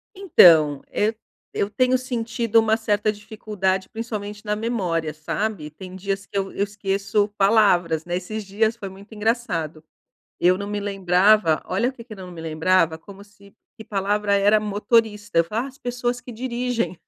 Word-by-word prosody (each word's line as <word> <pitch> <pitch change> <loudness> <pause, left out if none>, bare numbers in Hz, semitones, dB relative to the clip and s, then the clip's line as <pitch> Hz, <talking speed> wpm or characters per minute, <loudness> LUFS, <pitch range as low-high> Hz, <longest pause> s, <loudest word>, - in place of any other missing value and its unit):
Então, 160 - +6
eu 215 +2 +1 0.4
eu 200 - 0
tenho 255 +3 +2
sentido 230 -2 -1
uma 220 0 +3
certa 215 -1 0
dificuldade 205 -3 -3
principalmente 210 -2 -6
na 210 0 -1
memória, 180 -9 -2
sabe? 155 +2 -3
Tem 185 +4 -11
dias 195 +1 -3
que 200 - -6
eu 195 0 -2
eu 200 - -1
esqueço 200 0 -1
palavras, 185 -6 +3
né? 175 0 -2
Esses 210 +4 -6
dias 220 +3 0
foi 200 - -6
muito 200 +3 -14
engraçado, 205 -9 -2 0.6
eu 180 +1 +4
não 200 +1 -5
me 205 0 -3
lembrava 195 -2 +3
olha 210 +7 0
o - - -7
que 235 - -12
que 235 - -10
eu - - -13
não 185 -1 -9
me 170 -2 -9
lembrava, 160 +1 +1
como 200 +4 -13
se 200 -1 -20 0.2
que 220 - -9
palavra 205 +1 0
era 205 +2 +4
motorista. 210 -1 +1
Eu - - +5
falava: 220 +9 -3
"Ah, - - -8
as 265 - -18
pessoas 245 -1 -3
que 245 - -10
dirigem". 240 -3 -2
205 Hz, 175 wpm, -23 LUFS, 185-225 Hz, 0.6 s, Então